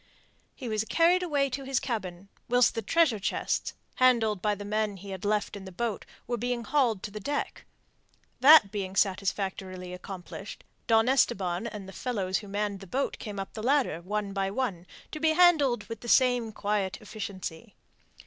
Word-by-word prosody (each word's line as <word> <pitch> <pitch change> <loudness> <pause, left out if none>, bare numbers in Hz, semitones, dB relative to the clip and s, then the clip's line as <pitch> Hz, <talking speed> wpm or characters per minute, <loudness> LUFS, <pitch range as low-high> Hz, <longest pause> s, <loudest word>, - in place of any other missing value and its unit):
He 255 - -7
was 215 -1 0
carried 335 - +3
away 290 -6 +1
to 270 +2 -4
his 270 -1 0
cabin, 195 -6 -5 0.2
whilst 245 0 +4
the 225 - -2
treasure 265 - +2
chests, - - -1 0.2
handled 230 -6 +3
by 210 +1 +1
the 205 0 -8
men 210 -1 -1
he 195 +1 -9
had 190 -1 -6
left 210 0 0
in 200 - -8
the 190 - -8
boat, 220 +3 -3 0.2
were 240 0 -2
being 245 +1 -2
hauled 240 -8 +1
to 210 - -5
the 210 - -6
deck. 285 +8 -3 0.7
That 270 -6 +8
being 195 -2 -4
satisfactorily 190 -2 -1
accomplished, 185 +2 -8 0.2
Don 225 0 +4
Esteban 190 -7 +1
and 210 -4 -7
the 195 - -10
fellows 195 -7 -2
who 205 - -11
had - - -11
manned 205 -1 -2
the 195 - -11
boat 270 +9 -2
came 205 -2 -6
up 195 - -6
the 215 - -6
ladder, 250 - +1
one 205 +2 -3
by 195 -1 0
one, 195 -6 -3 0.2
to 305 - -5
be 315 0 +3
handled 315 -8 +4
with 230 -2 -7
the 240 - -7
same 245 -3 +4
quiet 205 -2 -1
efficiency. 205 -2 -7
210 Hz, 185 wpm, -28 LUFS, 195-245 Hz, 0.7 s, That